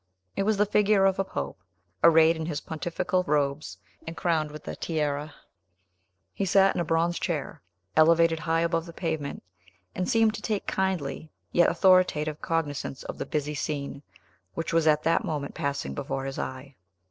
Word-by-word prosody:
It - - 0
was 215 - +2
the 210 - +4
figure 205 -1 +3
of 190 0 +2
a - - +3
pope, 190 - -5 0.4
arrayed 165 0 +6
in 160 -1 -4
his 150 -4 -2
pontifical 175 +4 -2
robes, 145 0 -1 0.3
and 165 - -6
crowned 160 -3 0
with 150 0 -10
the - - -6
tiara. 150 -2 -2 1.0
He - - -2
sat 195 0 +4
in - - -1
a - - +1
bronze 165 +2 0
chair, 155 -6 -3 0.3
elevated 165 +1 +5
high 165 +1 0
above 165 0 0
the 170 - -9
pavement, 160 -4 -4 0.5
and 180 - -2
seemed 225 -1 +3
to 210 - -7
take 210 -2 -2
kindly 170 -5 -2 0.2
yet 175 - +4
authoritative 170 -5 +3
cognizance 145 -5 -2
of - - -7
the - - -4
busy 150 -1 -2
scene 145 -1 -4 0.5
which 165 0 -3
was 165 -1 +3
at 150 0 +4
that 165 +1 +2
moment 145 -3 -3
passing 140 0 -3
before 135 -1 -4
his 135 0 -5
eye. 130 +1 -6
160 Hz, 170 wpm, -27 LUFS, 150-175 Hz, 1.0 s, arrayed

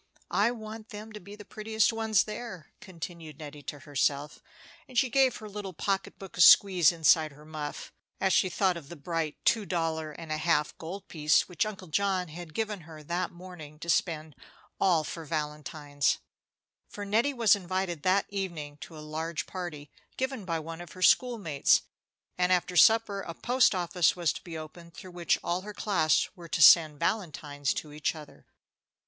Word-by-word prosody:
"I - - +4
want 220 -2 -8
them 215 +1 -9
to 210 - -7
be 200 +2 -11
the 210 -1 -12
prettiest 220 0 0
ones 220 -3 +2
there," 210 -6 -8
continued 165 -4 -8
Nettie 150 -1 -9
to 145 0 -7
herself, 145 0 -1 0.5
and 255 - -9
she 255 -1 +3
gave 270 -3 +4
her 215 - -8
little 205 -2 -6
pocket 195 +3 -2
book 195 -2 -10
a - - +5
squeeze 180 -3 +7
inside 160 -2 +3
her 150 +2 -16
muff 155 -1 -6 0.3
as 190 -1 +2
she 185 - +3
thought 185 0 +1
of 150 -4 -11
the 175 - -8
bright 160 0 -3
two 225 -2 +3
dollar 160 -4 -2
and 160 +1 -9
a 155 - 0
half 155 -2 +1
gold 180 +5 -7
piece 150 -1 +2
which 195 +4 -1
Uncle 195 -3 -8
John 185 +1 0
had 165 0 -10
given 215 -3 -2
her 155 -1 -12
that 175 +4 -2
morning 175 -4 -11
to 170 +2 -8
spend 155 -3 -1 0.4
all 175 -5 +3
for 165 +2 -6
valentines; 150 -2 -2 0.7
for 205 - -7
Nettie 225 +8 +2
was 230 -4 +5
invited 185 -3 -3
that 190 +3 +2
evening 170 -7 -5
to 160 +1 -11
a 150 - -9
large 160 +1 -3
party, 165 -6 -7 0.3
given 260 -5 -3
by 165 -2 -1
one 165 +1 -7
of 175 - -10
her 185 - -5
school 245 +3 +4
mates, 155 -9 +2 0.6
and 180 0 +2
after 180 0 +1
supper 220 +1 +5
a 170 -3 -7
post 245 0 +3
office 175 -1 +2
was 175 -4 +1
to - - -8
be 170 -3 -7
opened, 170 +2 -11
through 185 - -10
which 175 -1 +1
all 175 +2 -1
her 210 +1 -9
class 160 -8 +2
were 170 -3 -11
to 165 - -1
send 155 -2 +7
valentines 155 -7 -1
to 150 -1 -6
each 150 +2 -1
other. 155 -2 -13
175 Hz, 185 wpm, -29 LUFS, 155-200 Hz, 0.7 s, squeeze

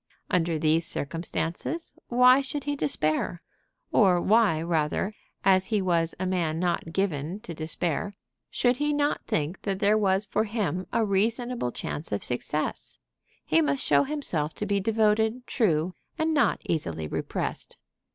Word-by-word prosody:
Under 170 -2 +1
these 155 +2 +2
circumstances, 165 - -3
why 250 +2 +6
should 275 +1 -4
he 290 0 -1
despair? 155 - 0 0.5
or 185 -5 +4
why, 205 -4 +3
rather, 165 +4 0 0.3
as 190 -1 +4
he 215 -3 +1
was 170 -3 +1
a 185 - -1
man 170 -4 0
not 170 -1 -1
given 175 -1 -1
to 170 - -7
despair, 165 +4 -3 0.3
should 245 0 +1
he 295 +1 +1
not 290 0 0
think 155 +4 -1
that 195 -2 -2
there 205 +2 +3
was 195 0 +2
for 210 +2 0
him 190 -5 -2
a 225 - +2
reasonable 225 - 0
chance 150 - -5
of 100 - -1
success? 150 +5 -2 0.5
He 160 +1 +3
must 140 -3 0
show 140 -1 +4
himself 170 - -2
to 210 - -3
be 200 0 +1
devoted, 220 +3 +1
true, 180 - +1 0.2
and 320 0 +1
not 290 - +2
easily 85 - -2
repressed. - - -4
185 Hz, 150 wpm, -27 LUFS, 160-220 Hz, 0.5 s, why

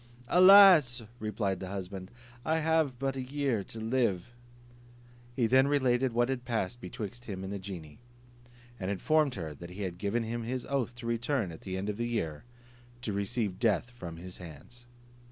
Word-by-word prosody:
"Alas!" 180 - +8 0.2
replied 105 -3 -2
the 95 - -6
husband, 95 -1 -6 0.3
"I 160 +2 +1
have 160 -4 +1
but 135 +1 -2
a 135 - -3
year 130 -5 -1
to 115 - -8
live." 115 -3 0 1.0
He 120 - +2
then 130 +4 +5
related 130 -3 +2
what 120 +1 +2
had 130 -2 -2
passed 120 -1 -2
betwixt 120 +3 -7
him 95 -3 -5
and 95 +1 -5
the 100 - -4
genie, 90 -5 -8 0.8
and 95 -1 -3
informed 145 - +2
her 80 -5 -5
that 85 +4 -10
he 95 +3 -6
had 90 -2 -5
given 110 +4 0
him 115 +1 -3
his 125 +2 -3
oath 130 -3 -1
to 125 -1 -10
return 115 -3 -1
at 80 - -11
the 95 -1 -4
end 95 +2 -3
of 105 -1 -2
the 120 0 -1
year, 80 -10 -3 0.6
to 105 - -2
receive 100 -1 -2
death 115 +1 +1
from 85 -9 -8
his 90 +2 -8
hands. 90 +9 -12
115 Hz, 180 wpm, -30 LUFS, 95-130 Hz, 1.0 s, Alas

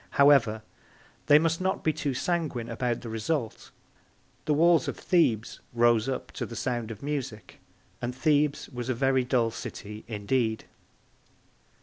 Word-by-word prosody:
However, 135 -7 +5 0.6
they 145 - +8
must 165 +2 +1
not 190 +1 -1
be 155 - +2
too 145 -3 -2
sanguine 145 -7 -2
about 120 0 -2
the 115 - -7
result. 115 +2 -3 0.8
The 150 - +2
walls 165 -1 +4
of - - -3
Thebes 120 - +1
rose 120 0 +3
up 130 - -4
to - - -5
the 115 - -8
sound 120 -2 -2
of 110 +1 -8
music, 135 -7 -5 0.4
and 125 0 -3
Thebes 150 +1 +1
was 125 -1 -6
a 130 - +1
very 130 +1 +2
dull 120 -3 +1
city 105 -1 -8
indeed. 110 +1 -1
125 Hz, 145 wpm, -27 LUFS, 115-145 Hz, 0.8 s, they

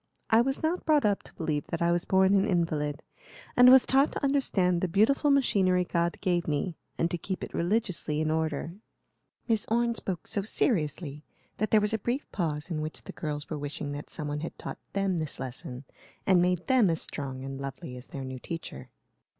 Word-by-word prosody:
I 225 +1 +7
was 270 +4 -1
not 335 +3 0
brought 300 -5 +3
up 205 -1 +2
to - - -14
believe 155 -4 -2
that 165 - -3
I 170 0 +2
was 175 0 0
born 190 +1 +4
an 200 +1 +3
invalid, 155 -6 0 0.5
and 250 0 +8
was 260 0 +8
taught 270 +2 +3
to - - -5
understand 195 -11 +2
the 185 - +1
beautiful 220 - +3
machinery 195 -10 +3
God 170 -1 0
gave 175 -2 +1
me, 155 +3 -1 0.2
and 165 0 0
to 175 - -2
keep 190 +1 -4
it - - -6
religiously 175 -5 0
in 155 0 +1
order." 160 0 -1 0.7
Miss 225 -3 +1
Orne 235 +1 +2
spoke 190 -6 -4
so 200 - -1
seriously 155 - -1 0.3
that 215 - 0
there 215 - +5
was 210 +1 +1
a 220 - +1
brief 245 +7 -2
pause 160 -2 -2
in 155 -2 -1
which 155 +1 -5
the - - -9
girls 150 -1 -4
were 155 - -4
wishing 145 0 -4
that 145 +1 -6
some 150 - -5
one 145 0 -2
had 165 - -6
taught - - -7
them 195 -3 0
this 155 -2 -3
lesson 130 0 -6 0.4
and 185 -2 +5
made 180 0 +1
them 255 -7 +4
as 165 -1 0
strong 135 -3 -4
and 135 0 -6
lovely 135 -2 -6
as 125 +1 -9
their 135 - -6
new 130 0 -6
teacher. 165 +5 -7
175 Hz, 205 wpm, -28 LUFS, 150-210 Hz, 0.7 s, and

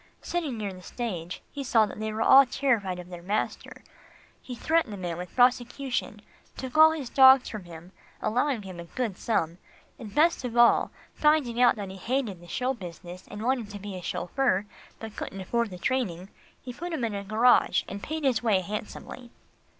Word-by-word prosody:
Sitting 315 -9 -2
near 205 -3 -4
the 185 - -12
stage, 180 -6 -5
he 280 - -5
saw 230 -4 +4
that 210 - -9
they 215 0 -3
were 220 +1 -1
all 270 +3 +8
terrified 235 -8 0
of 180 0 -9
their 175 -1 -8
master. 200 +5 -3 0.6
He 250 - -7
threatened 320 +1 +1
the - - -6
man 175 -3 -4
with 180 0 -8
prosecution, 245 -3 +1 0.3
took 260 0 -6
all 315 0 +9
his 315 -5 -4
dogs 265 +1 +7
from 210 -5 -7
him, 170 +1 -12 0.3
allowing 245 0 0
him 185 -3 -9
a 170 - -7
good 220 +2 -3
sum; 175 -7 -1 0.4
and 215 -5 -9
best 325 -1 +3
of 240 -1 -4
all, 235 0 +5 0.2
finding 295 -6 +2
out 245 - +6
that 200 -3 -6
he 190 - -9
hated 225 -2 -2
the 175 - -14
show 255 +7 -1
business 180 -4 -10
and 210 - -7
wanted 245 -3 0
to 205 - -7
be 200 -1 -7
a 180 - -6
chauffeur, 190 +4 0 0.3
but 220 -1 -8
couldn't 195 - -6
afford 235 +4 -1
the 180 - -8
training, 190 -4 -2 0.3
he 250 - -8
put 340 +6 -6
him 265 - -2
in 225 -2 -1
a 200 0 -4
garage 220 +5 +3
and 200 - -6
paid 315 +4 -4
his 255 -5 +2
way 215 -6 +2
handsomely. 210 +5 -7
225 Hz, 195 wpm, -27 LUFS, 190-255 Hz, 0.6 s, all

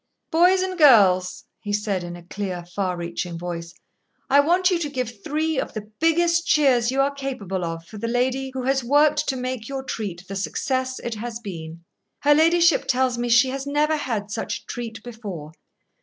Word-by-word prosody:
"Boys 360 +3 +4
and 370 -1 -4
girls," 195 - +5
he 205 - -5
said 205 -3 -1
in 175 0 -6
a 175 - -12
clear, 180 -1 -5
far 180 0 -2
reaching 170 0 -4
voice, 170 -1 -5 0.6
"I 280 - +7
want 355 +6 +3
you 350 - +1
to 300 -3 -2
give 245 -6 -5
three 310 -1 -1
of - - -4
the 215 0 -7
biggest 335 +1 +2
cheers 255 -6 +4
you 265 +1 -1
are 280 +1 +1
capable 220 -10 -4
of 165 0 -4
for 210 +4 -10
the 230 - -3
lady 255 +3 0
who 260 - -3
has 270 0 +1
worked 295 +3 +3
to 270 - 0
make 250 -3 -4
your 270 -1 -4
treat 190 -8 -5
the 195 - -6
success 260 +6 -2
it 235 - -4
has 225 +1 -5
been. 170 -6 -8 0.4
Her 295 0 +5
ladyship 335 +1 +4
tells 255 -1 +1
me 240 0 -1
she 245 +3 +5
has 270 +1 -4
never 300 +2 +2
had 225 -8 -3
such 225 - -3
a - - -31
treat 230 -2 -6
before. 205 -11 -8
245 Hz, 195 wpm, -23 LUFS, 195-285 Hz, 0.6 s, I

